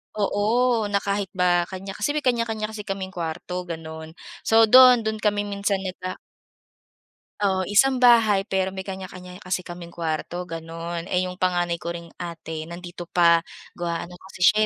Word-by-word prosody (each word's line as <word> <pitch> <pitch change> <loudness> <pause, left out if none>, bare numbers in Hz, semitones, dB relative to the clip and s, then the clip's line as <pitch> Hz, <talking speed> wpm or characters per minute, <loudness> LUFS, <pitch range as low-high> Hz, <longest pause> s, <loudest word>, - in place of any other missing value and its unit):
Oo, 220 +3 +1
na 200 0 +1
kahit 200 0 -1
ba 175 -1 +2
kanya 190 +1 -7
kasi 210 +9 -2
may 300 - -1
kanya-kanya 225 -3 0
kasi 220 -1 -6
kaming 195 -1 -4
kuwarto, 180 +1 -4
ganon. 160 -1 -7 0.3
So 225 0 +6
doon, 250 +1 +8
doon 220 0 -2
kami 205 -1 +1
minsan 200 -1 -1
nag 185 -1 -5
a 185 - -4 1.3
O, 190 -2 +2
isang 260 +5 +4
bahay 225 -5 +6
pero 190 0 0
may 190 - -4
kanya-kanya 185 -1 -8
kasi 185 0 -1
kaming 175 -1 -9
kuwarto, 165 +1 -3
ganon, 165 +1 -5
eh, 180 -1 0
yung 180 - -8
panganay 175 -2 0
ko 170 0 -5
ring 170 0 -8
ate 165 -2 -6
nandito 175 +1 -8
pa, 170 -1 +4 0.3
gawa 170 -1 -2
ano 180 - -12
kasi 190 0 -13
siya, 215 +4 +5
185 Hz, 170 wpm, -24 LUFS, 170-210 Hz, 1.3 s, doon